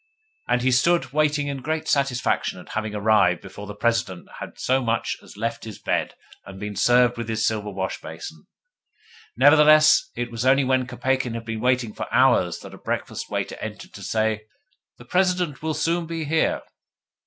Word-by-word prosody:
And 125 0 +1
he 130 - +3
stood 130 0 +2
waiting 150 -1 +2
in 140 -2 -4
great 155 +3 -3
satisfaction 140 -3 0
at - - -14
having 110 -1 -3
arrived 100 -4 +3
before 100 +1 -10
the 105 - -7
President 105 -5 -1
had - - -8
so 130 +1 +1
much 115 -1 -1
as - - -15
left 115 +2 -3
his 110 -4 -8
bed - - -2 0.3
and 95 0 -11
been 105 0 -5
served 120 +2 +4
with 115 -1 -5
his 110 -1 0
silver 105 -2 -1
wash 95 -1 -4
basin. - - -9 0.9
Nevertheless, 155 +1 +6
it 120 0 -4
was 115 0 -3
only 135 +2 +4
when 130 -1 +1
Kopeikin 130 -1 -1
had 115 0 -6
been 115 -1 -4
waiting 125 -3 +1
four - - -6
hours - - +3
that - - -11
a - - -12
breakfast - - -4
waiter - - -3
entered - - -8
to - - -10
say, 110 -1 -1 0.5
'The 120 - -14
President 180 -2 0
will 160 0 -2
soon 165 +2 0
be 165 -1 -4
here. 160 +2 0
125 Hz, 180 wpm, -23 LUFS, 110-145 Hz, 0.9 s, Nevertheless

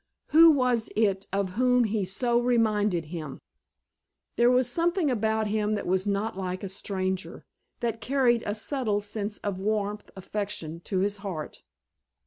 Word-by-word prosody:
Who 330 +2 +8
was 250 -6 +2
it 200 -3 +1
of 195 -1 0
whom 250 +4 +3
he 210 -3 0
so 235 +6 +1
reminded 215 -7 +1
him? 155 -5 -6 1.0
There 240 +1 +4
was 250 0 +3
something 335 +3 +1
about 220 -1 0
him 210 0 0
that 205 - -4
was 190 +2 0
not 205 +3 -1
like 185 0 -4
a 195 - -4
stranger, 190 -1 -4 0.4
that 230 -1 -2
carried 250 -3 +2
a 205 - -1
subtle 220 -3 -1
sense 205 0 -4
of 200 -2 -4
warmth, 210 0 -2
affection, 195 -4 -5
to 190 -2 -1
his 205 +1 0
heart. 185 -7 -6
210 Hz, 150 wpm, -27 LUFS, 195-240 Hz, 1.0 s, Who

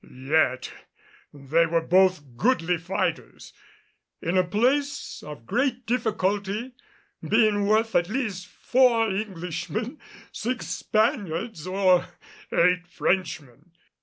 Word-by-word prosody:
Yet 130 0 0 0.6
they 150 +4 +1
were 165 0 0
both 180 -8 +2
goodly 180 - +1
fighters 170 +4 -3 0.7
in 170 +3 -2
a 185 - +4
place 255 +10 0
of 145 -6 -10
great 250 - -1
difficulty 215 -1 -1 0.5
being 215 -2 +2
worth 220 +2 +2
at 175 - +3
the 200 - -8
least 210 -8 -3
four 235 -2 +2
Englishmen, 190 - -4 0.3
six 240 +1 -3
Spaniards 205 -4 -1
or 185 -1 +3 0.4
eight 180 +1 +2
Frenchmen. 165 -5 -3
190 Hz, 105 wpm, -25 LUFS, 170-225 Hz, 0.7 s, a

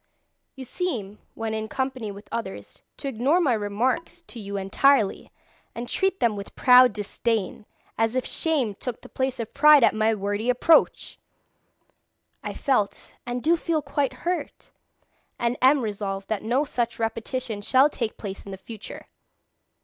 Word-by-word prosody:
You 265 -1 -8
seem 230 - -4 0.2
when 225 -1 -3
in 220 0 -3
company 260 -3 -3
with 200 +1 -12
others 225 -4 -6 0.2
to 280 - -5
ignore 270 +7 +2
my 290 -8 +2
remarks 240 +11 -2
to 245 - -10
you 200 -1 -5
entirely, 205 +4 +2 0.4
and 240 +1 -5
treat 385 +6 0
them 230 -3 +2
with 200 -1 -8
proud 250 -1 +7
disdain, 210 0 -3 0.3
as 225 +2 +1
if 255 - 0
shame 285 -10 0
took 240 +4 -6
the - - -12
place 260 -1 -2
of 230 - -5
pride 300 -2 +7
at - - +5
my 220 +1 +2
wordy 205 +3 -2
approach! 250 +6 +3 1.2
I - - -4
felt 215 -8 -1
and 245 0 -3
do 330 +2 +4
feel 320 -2 -1
quite 280 -1 -1
hurt, 355 0 -3 0.7
and 240 +1 0
am 265 +2 +5
resolved 200 -3 -4
that 220 -2 -1
no 245 +6 +1
such 240 -3 -2
repetition 230 0 -3
shall 260 +6 +4
take 235 -7 -4
place 195 -2 -7
in 195 -1 -8
future. 220 +2 -10
235 Hz, 155 wpm, -25 LUFS, 210-270 Hz, 1.2 s, proud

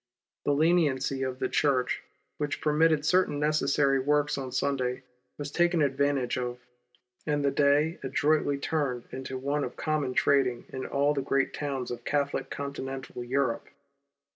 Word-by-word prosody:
The 145 - +3
leniency 145 -4 +2
of 130 -1 -2
the - - -1
Church 130 -4 +1 0.4
which 150 -1 -2
permitted 155 0 +3
certain 180 -5 +2
necessary 145 -2 +2
works 145 +2 +1
on 130 -2 -5
Sunday, 130 -1 -1 0.3
was 145 -1 -5
taken 175 -1 +3
advantage 140 -2 +1
of, 125 0 -3 0.7
and 145 -1 +1
the 140 - +3
day 145 +4 +2
adroitly 150 -2 +1
turned 140 -4 -1
into 130 0 -5
one 140 +3 -1
of - - -5
common 150 -5 -1
trading 130 -4 +2
in 130 0 -5
all 140 +1 +2
the 140 - -1
great 135 0 0
towns 135 -4 -3
of 120 -1 -6
Catholic 140 +1 -1
Conti 140 0 -5
nental 135 -2 -6
Europe. 130 -3 0
140 Hz, 150 wpm, -28 LUFS, 130-150 Hz, 0.7 s, The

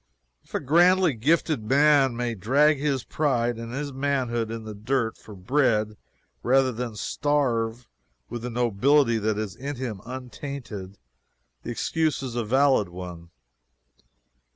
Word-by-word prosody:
If - - -11
a - - +1
grandly 175 +3 +4
gifted 150 +3 +1
man 135 0 +4
may 120 -1 -1
drag 140 +9 +3
his 140 -3 0
pride 120 -6 0
and 115 0 -6
his 140 +2 -4
manhood 130 -4 -1
in 115 0 -5
the 110 -1 -7
dirt 115 +2 -1
for 105 - -13
bread 110 0 +1 0.5
rather 130 +1 +3
than 120 -1 -5
starve 120 -3 -1 0.4
with 120 - -6
the 125 - -4
nobility 120 +2 +2
that 110 0 0
is 105 -4 -4
in 140 +2 -5
him 120 -7 -5
untainted, 125 -5 -7 0.6
the - - -7
excuse 155 +4 -1
is 130 -3 -5
a 120 0 -1
valid 130 -3 +3
one. 90 -1 -9
125 Hz, 140 wpm, -25 LUFS, 110-140 Hz, 0.6 s, grandly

